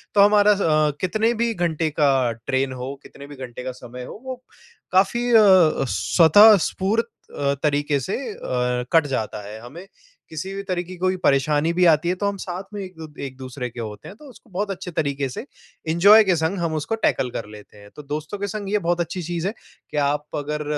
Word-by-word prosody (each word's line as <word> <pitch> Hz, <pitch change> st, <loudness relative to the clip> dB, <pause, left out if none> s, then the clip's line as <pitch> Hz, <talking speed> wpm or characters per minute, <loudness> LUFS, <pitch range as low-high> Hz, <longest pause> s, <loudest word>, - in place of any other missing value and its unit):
तो 200 Hz, -, +6 dB
हमारा 205 Hz, 0 st, +6 dB
अ, 155 Hz, -7 st, +2 dB
कितने 220 Hz, +5 st, +1 dB
भी 235 Hz, -1 st, 0 dB
घंटे 170 Hz, -4 st, -1 dB
का 135 Hz, -4 st, +3 dB, 0.2 s
ट्रेन 130 Hz, 0 st, 0 dB
हो, 130 Hz, +2 st, -5 dB
कितने 140 Hz, 0 st, -12 dB
भी 145 Hz, -, -11 dB
घंटे 125 Hz, -2 st, -8 dB
का 130 Hz, -, -4 dB
समय 125 Hz, +1 st, -8 dB
हो, -, -, -10 dB
वो 255 Hz, -1 st, -7 dB, 0.5 s
काफ़ी 220 Hz, +6 st, +2 dB
अ, 190 Hz, -10 st, +5 dB
स्वतःस्फूर्त 205 Hz, +4 st, +4 dB, 0.5 s
तरीक़े 145 Hz, -1 st, +1 dB
से 135 Hz, +9 st, -3 dB, 0.2 s
अ, -, -, -14 dB, 0.6 s
कट 160 Hz, -3 st, +4 dB
जाता 110 Hz, -6 st, -3 dB
है। 110 Hz, +1 st, -8 dB
हमें 145 Hz, +10 st, -11 dB, 0.4 s
किसी 170 Hz, +5 st, -6 dB
भी 195 Hz, 0 st, -5 dB
तरह 185 Hz, -3 st, -2 dB
की 185 Hz, +1 st, -10 dB
कोई 185 Hz, +1 st, 0 dB
परेशानी 145 Hz, +3 st, +2 dB
भी 180 Hz, +1 st, +3 dB
आती 155 Hz, +2 st, +1 dB
है, 180 Hz, -, +1 dB
तो 200 Hz, -, -3 dB
हम 200 Hz, 0 st, -2 dB
साथ 185 Hz, 0 st, -6 dB
में 205 Hz, -, -5 dB
एक-दू 170 Hz, -4 st, -9 dB, 0.2 s
एक-दूसरे 130 Hz, -1 st, -6 dB
के 120 Hz, -, -11 dB
होते 105 Hz, -2 st, -8 dB
हैं, 195 Hz, -, -10 dB
तो 300 Hz, -, -15 dB
उसको 245 Hz, -2 st, -18 dB
बहुत 200 Hz, +2 st, -3 dB
अच्छे 190 Hz, -1 st, -6 dB
तरीक़े 140 Hz, -3 st, -2 dB
से, 130 Hz, -, -7 dB, 0.4 s
एंजॉय 200 Hz, +7 st, +7 dB
के 190 Hz, -3 st, +2 dB
संग, 160 Hz, +5 st, -1 dB
हम 165 Hz, -2 st, -1 dB, 0.3 s
टैकल 125 Hz, -, +1 dB
कर 115 Hz, -, -5 dB
लेते 105 Hz, 0 st, -14 dB
हैं। 105 Hz, 0 st, -15 dB
तो 150 Hz, -, -10 dB
दोस्तों 150 Hz, +6 st, -5 dB
के 200 Hz, -, -2 dB
संग 200 Hz, 0 st, -5 dB
ये 210 Hz, -, +2 dB
बहुत 175 Hz, -1 st, -1 dB
अच्छी 175 Hz, +2 st, -4 dB
चीज़ 170 Hz, +2 st, -3 dB
है 205 Hz, -, -2 dB, 0.4 s
कि -, -, -4 dB
आप 145 Hz, +1 st, 0 dB
अगर 150 Hz, +1 st, -3 dB
165 Hz, 200 wpm, -22 LUFS, 140-195 Hz, 0.6 s, एंजॉय